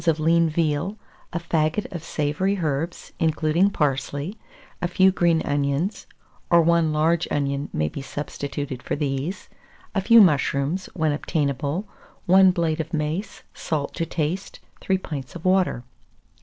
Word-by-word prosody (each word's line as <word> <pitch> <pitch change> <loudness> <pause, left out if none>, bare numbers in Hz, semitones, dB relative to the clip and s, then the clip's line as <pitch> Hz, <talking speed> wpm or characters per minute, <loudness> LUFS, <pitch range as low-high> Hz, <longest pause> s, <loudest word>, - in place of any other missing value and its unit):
of 160 -1 +3
lean 165 +1 +3
veal, 160 +5 -1 0.3
a 170 - -2
faggot 165 +3 0
of 170 -3 -5
savoury 160 +7 -1
herbs, 160 0 -3
including 160 +4 +2
parsley, 145 +2 -1 0.5
a 175 - +1
few 190 +2 +4
green 170 -3 +2
onions 145 +7 -1 0.4
(or 170 - +6
1 170 -1 +3
large 160 +3 +2
onion 140 0 -1
may 75 0 0
be 135 - -6
substituted 140 -1 -5
for - - -2
these), 145 +5 -3 0.5
a 195 - +1
few 230 +4 +7
mushrooms, 150 -1 +3
when 160 -3 +1
obtainable; 145 - -1 0.4
1 190 +1 +7
blade 165 -3 0
of 160 - -8
mace, 155 +6 -3
salt 150 -3 -3
to - - -2
taste, 165 +3 -3 0.2
3 190 - +1
pints 145 -7 -7
of 170 - -9
water. 185 -9 +2
160 Hz, 140 wpm, -24 LUFS, 145-175 Hz, 0.5 s, few